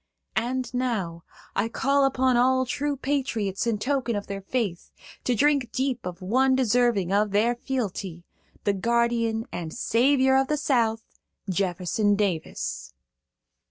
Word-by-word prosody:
"And 250 +2 -1
now, 205 -10 -2 0.3
I 215 +3 +1
call 275 +4 +2
upon 260 -1 +2
all 260 +1 +3
true 285 +3 -2
patriots 245 -7 -1
in 225 -2 +1
token 250 0 -1
of 205 - -3
their 200 0 -5
faith, 195 -5 -3 0.4
to 250 - +2
drink 280 -1 +2
deep 260 -6 -2
of 180 0 -7
one 260 +7 +3
deserving 240 -6 +2
their 210 +3 +2
fealty,–the 205 -6 -4
guardian 230 +1 +1
and 165 -2 -5
savior 265 - +3
of 270 0 +2
the 300 - 0
South, 230 -6 +1 0.4
Jefferson 190 +2 +1
Davis." 190 - -3
235 Hz, 125 wpm, -26 LUFS, 200-260 Hz, 0.4 s, all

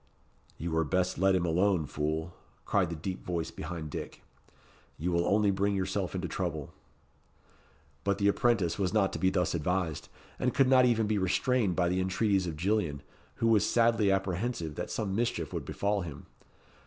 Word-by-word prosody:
"You 85 +2 -4
were 80 0 +2
best 90 +3 0
let 95 0 +4
him 90 -1 +1
alone, 90 0 +2
fool," 80 +4 -3 0.3
cried 95 -4 +1
the 85 - -4
deep 90 +4 -5
voice 85 -2 -3
behind 80 -2 -6
Dick. - - -7 0.7
"You 85 +4 -2
will 85 0 +1
only 105 0 +3
bring 100 +1 0
yourself 95 0 -2
into 90 -1 -2
trouble." 80 -7 -4 1.3
But 100 0 +1
the 100 - +2
apprentice 100 -5 +2
was 95 -1 0
not 100 -3 +2
to - - -3
be 95 - +3
thus 90 -1 0
advised; 85 0 -1 0.3
and 125 - 0
could 135 - +4
not 130 -1 +6
even 115 -2 +2
be 105 -1 0
restrained 100 +2 +1
by 90 -2 +2
the 90 +1 +1
entreaties 95 0 +1
of 80 -3 -4
Gillian, 85 -6 0 0.3
who 115 - 0
was 110 -3 +4
sadly 115 -3 +3
apprehensive 95 -2 -1
that - - -5
some 100 -3 -2
mischief 115 +2 -1
would - - -4
befall 100 0 -1
him. 80 -6 -8
95 Hz, 180 wpm, -30 LUFS, 85-100 Hz, 1.3 s, not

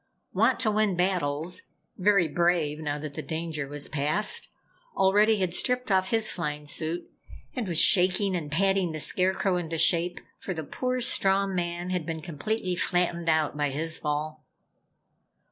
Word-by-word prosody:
Wantowin 215 -5 +2
Battles, 175 -2 0 0.3
very 195 -2 +3
brave 165 -2 0
now 150 -2 -3
that 150 -1 -7
the - - -5
danger 160 -3 -4
was 145 0 -3
past, 155 +8 +1 0.5
already 210 +3 +4
had 185 -3 -1
stripped 250 +2 0
off 190 0 +2
his 225 -1 +3
flying 150 -6 -4
suit 160 +3 -2 0.5
and 245 -6 -3
was 170 -3 0
shaking 185 +2 +4
and 155 -4 -4
patting 190 0 +1
the 155 - -5
Scarecrow 185 +3 +1
into 165 -2 -4
shape, 175 +2 +2 0.2
for 185 - -5
the 160 - -4
poor 255 - -3
straw 195 -4 +3
man 175 -1 -3
had 180 -3 -2
been 165 -1 -3
completely 180 +4 -3
flattened 175 -2 0
out 155 -2 +1
by 145 -1 0
his 160 +4 -1
fall. 150 +1 -3
175 Hz, 150 wpm, -27 LUFS, 155-190 Hz, 0.5 s, already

